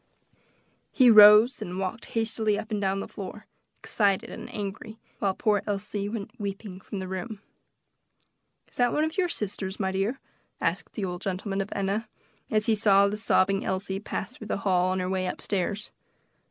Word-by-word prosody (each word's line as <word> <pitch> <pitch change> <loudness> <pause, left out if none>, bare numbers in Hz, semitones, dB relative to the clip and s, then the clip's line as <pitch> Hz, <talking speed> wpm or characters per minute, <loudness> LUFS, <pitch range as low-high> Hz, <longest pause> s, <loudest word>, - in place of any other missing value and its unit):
He 250 -3 +6
rose 215 +3 +8
and 180 +1 -5
walked 195 +5 -3
hastily 220 -2 +1
up 220 - -6
and 210 -1 -1
down 195 0 0
the - - -6
floor, 210 +2 -8 0.3
excited 200 -3 0
and - - -8
angry, 210 +2 -6 0.2
while 195 -2 0
poor 210 -3 +2
Elsie 205 0 -3
went 210 -2 -5
weeping 200 -1 -5
from 200 - -7
the 190 -1 -4
room. 190 +3 -5 1.3
"Is - - -21
that 245 -1 +3
one 300 - +2
of 315 0 -2
your 360 -1 +2
sisters, 200 - -4
my 190 -2 0
dear?" 195 +7 -1 0.4
asked - - -2
the 205 - -2
old 180 -1 -5
gentleman 195 +1 -2
of 195 - -5
Enna, 200 +3 -1 0.4
as 215 -1 +1
he 225 - +3
saw 200 -2 +5
the 205 - -2
sobbing 195 -2 +2
Elsie 190 0 -2
pass 220 +4 -5
through 215 - -10
the - - -1
hall, 185 -1 +3
on 185 0 0
her 180 - -2
way 185 0 -1
up - - -4
stairs. 200 +2 -2
200 Hz, 180 wpm, -27 LUFS, 190-215 Hz, 1.3 s, rose